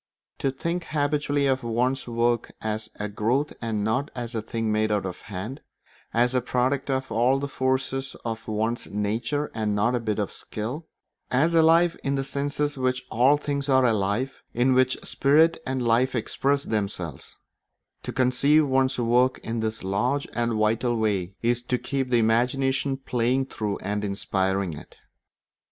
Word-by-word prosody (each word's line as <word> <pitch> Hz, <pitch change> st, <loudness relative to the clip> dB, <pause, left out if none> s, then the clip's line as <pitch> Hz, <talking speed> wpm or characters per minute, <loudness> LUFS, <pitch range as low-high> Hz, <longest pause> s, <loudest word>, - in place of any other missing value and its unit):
To 135 Hz, -, +1 dB
think 170 Hz, +6 st, -3 dB
habitually 145 Hz, -1 st, 0 dB
of 130 Hz, -1 st, +2 dB
one's 125 Hz, +3 st, 0 dB
work 120 Hz, 0 st, 0 dB
as 110 Hz, 0 st, -3 dB
a 105 Hz, -, -3 dB
growth 115 Hz, +8 st, 0 dB
and 110 Hz, -3 st, -1 dB
not 130 Hz, +7 st, 0 dB
a 120 Hz, -2 st, -3 dB
thing 115 Hz, 0 st, -2 dB
made 110 Hz, 0 st, +1 dB
out 105 Hz, -3 st, 0 dB
of 90 Hz, -1 st, -6 dB
hand, 105 Hz, +7 st, -6 dB, 0.5 s
as 120 Hz, +2 st, +2 dB
a 125 Hz, -, +2 dB
product 130 Hz, +3 st, 0 dB
of 130 Hz, -1 st, -1 dB
all 125 Hz, +4 st, +3 dB
the 140 Hz, +1 st, -3 dB
forces 130 Hz, 0 st, -1 dB
of 115 Hz, -1 st, -4 dB
one's 110 Hz, +2 st, -1 dB
nature 115 Hz, +8 st, -1 dB
and 105 Hz, -2 st, -1 dB
not 105 Hz, +4 st, +2 dB
a 125 Hz, -, +1 dB
bit 110 Hz, -3 st, -2 dB
of 105 Hz, -2 st, -2 dB
skill, 125 Hz, +10 st, -5 dB, 0.4 s
as 150 Hz, +7 st, +2 dB
alive 165 Hz, +1 st, +5 dB
in 140 Hz, 0 st, 0 dB
the 135 Hz, -, -1 dB
sense 140 Hz, +1 st, -3 dB
in 145 Hz, -2 st, 0 dB
which 130 Hz, 0 st, 0 dB
all 130 Hz, +6 st, +4 dB
things 140 Hz, -1 st, -3 dB
are 130 Hz, -1 st, +5 dB
alive 110 Hz, +4 st, 0 dB
in 125 Hz, +2 st, +3 dB
which 130 Hz, 0 st, +3 dB
spirit 155 Hz, +4 st, +3 dB
and 130 Hz, -1 st, -1 dB
life 125 Hz, +3 st, +3 dB
express 140 Hz, +4 st, 0 dB
themselves, 100 Hz, -9 st, -4 dB, 0.7 s
to -, -, -5 dB
conceive 135 Hz, +4 st, +3 dB
of 145 Hz, -, -2 dB
one's 130 Hz, 0 st, +2 dB
work 125 Hz, +2 st, +3 dB
in 115 Hz, 0 st, -3 dB
this 110 Hz, -1 st, -3 dB
large 115 Hz, +9 st, 0 dB
and 120 Hz, -1 st, 0 dB
vital 110 Hz, +3 st, +1 dB
way 100 Hz, -4 st, -1 dB
is 120 Hz, +1 st, +2 dB
to 125 Hz, +1 st, -1 dB
keep 135 Hz, 0 st, -2 dB
the 120 Hz, -, +3 dB
imagination 130 Hz, +4 st, +1 dB
playing 125 Hz, 0 st, 0 dB
through 105 Hz, -5 st, -3 dB
and 105 Hz, +2 st, -2 dB
inspiring 95 Hz, -2 st, -1 dB
it. 75 Hz, -, -12 dB
125 Hz, 170 wpm, -25 LUFS, 110-135 Hz, 0.7 s, alive